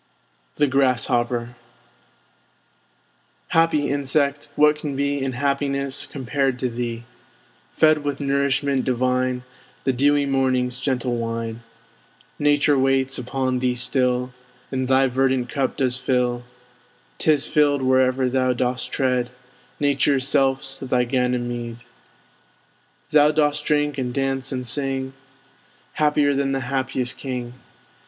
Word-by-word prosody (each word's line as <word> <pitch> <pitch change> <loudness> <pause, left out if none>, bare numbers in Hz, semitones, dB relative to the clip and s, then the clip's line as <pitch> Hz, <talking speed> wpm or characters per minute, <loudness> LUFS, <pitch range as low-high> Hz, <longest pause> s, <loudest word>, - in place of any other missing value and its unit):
THE 145 - +3
GRASSHOPPER 120 -3 0 1.9
Happy 165 -3 +2
Insect! 140 +1 0
what 150 0 +4
can 145 -3 -4
be 140 0 -1
In 135 -1 -2
happiness 140 +1 -1
compared 135 -1 -1
to 125 0 -1
thee? 120 0 -4 0.7
Fed 155 -1 +5
with 145 -1 -3
nourishment 140 -1 0
divine, 125 0 0 0.4
The 130 - +1
dewy 145 +3 +2
Morning's 130 -2 0
gentle 125 -3 -1
wine! 115 0 -4 0.8
Nature 145 -1 +3
waits 135 0 +1
upon 130 +1 -1
thee 125 -1 0
still, 125 0 0 0.4
And 130 -1 -1
thy 135 +1 +4
verdant 130 -1 0
cup 135 -3 -2
does 130 -2 +1
fill; 125 -2 0 0.7
'Tis 150 -3 +2
filled 145 -2 +2
wherever 130 0 +2
thou 130 0 +1
dost 125 +1 -2
tread, 125 -2 0 0.5
Nature's 140 -1 +1
self's 135 0 +1
thy 125 -2 0
Ganymede. 120 -2 -2 1.3
Thou 150 0 +6
dost 150 -1 +1
drink, 145 -2 +1
and 125 -1 -2
dance, 135 0 -1
and 130 -1 -3
sing; 135 +1 -1 0.8
Happier 150 -1 +2
than 135 0 0
the 135 - -1
happiest 130 -1 -2
king! 125 -3 -5
130 Hz, 115 wpm, -22 LUFS, 125-140 Hz, 1.9 s, Thou